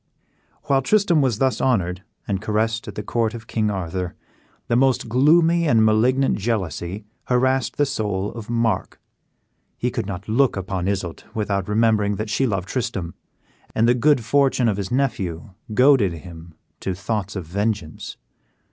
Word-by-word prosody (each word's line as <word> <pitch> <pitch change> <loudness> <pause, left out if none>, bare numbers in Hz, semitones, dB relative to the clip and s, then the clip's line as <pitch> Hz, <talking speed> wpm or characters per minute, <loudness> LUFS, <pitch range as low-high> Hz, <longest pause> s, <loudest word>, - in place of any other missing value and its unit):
While 135 -1 +2
Tristram 180 -1 +3
was 125 -6 +1
thus 130 0 +1
honored 95 -8 +1 0.3
and 100 -2 -1
caressed 115 +1 -1
at 105 - -7
the 105 - -4
court 115 +1 -1
of 115 -1 -9
King 110 -2 0
Arthur, 90 -2 -3 0.5
the 120 - +1
most 130 -1 +2
gloomy 165 +7 +4
and 115 -6 +4
malignant 125 +5 +2
jealousy 95 -2 -3 0.2
harassed 130 +1 +1
the 145 - +3
soul 105 -6 -2
of 115 -2 -9
Mark. 115 -1 -1 0.8
He 125 - -1
could 115 -4 -3
not 100 -1 -6
look 120 +1 +2
upon 95 -1 -3
Isoude 95 -4 -3
without 100 -3 -1
remembering 105 -1 +2
that 105 +1 -4
she 135 +4 +1
loved 95 -4 -2
Tristram, 100 - -3 0.6
and 115 - +3
the 120 - +5
good 125 -1 +2
fortune 135 -1 +3
of 105 -3 +1
his 100 -2 -3
nephew 100 -11 -1 0.2
goaded 125 -5 +4
him 85 0 -11 0.2
to 95 - -3
thoughts 105 +1 -3
of 95 -4 -4
vengeance. 100 -2 -3
110 Hz, 155 wpm, -22 LUFS, 95-125 Hz, 0.8 s, the